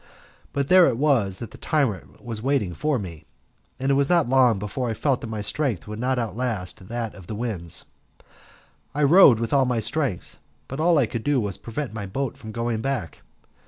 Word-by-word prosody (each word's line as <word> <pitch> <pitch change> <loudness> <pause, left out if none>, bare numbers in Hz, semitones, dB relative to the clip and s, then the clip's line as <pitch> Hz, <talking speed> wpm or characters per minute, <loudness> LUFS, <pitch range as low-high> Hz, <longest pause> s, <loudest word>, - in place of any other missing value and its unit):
But 140 -1 -1
there 185 +1 +7
it 115 - 0
was 120 -10 +2
that 115 - -7
the - - -13
tyrant 135 - -1
was 115 -3 -4
waiting 125 -8 0
for 150 - 0
me, 85 -8 -7 0.5
and 135 +1 +1
it - - +4
was 140 0 +2
not 170 -5 +3
long 125 -4 +4
before 105 +5 -3
I 110 - -2
felt 135 +2 0
that - - -5
my 110 -1 -3
strength 105 - -2
would 105 +1 -6
not 130 +2 0
outlast 110 -6 -3
that 115 -1 -3
of 95 -4 -13
the 110 - -5
winds. 105 -8 -4 1.1
I 150 - +1
rowed 145 - +7
with 115 +2 -2
all 135 -2 +4
my 125 -2 0
strength, 130 - -2 0.3
but 135 - -6
all 165 +1 +4
I 140 - +4
could 115 0 -5
do 145 -2 +2
was 100 -5 -2
to - - -27
prevent 120 +2 -4
my 105 -3 -5
boat 130 +6 -3
from 110 - -9
going 115 0 -2
back. 125 -10 -3
120 Hz, 210 wpm, -24 LUFS, 105-140 Hz, 1.1 s, there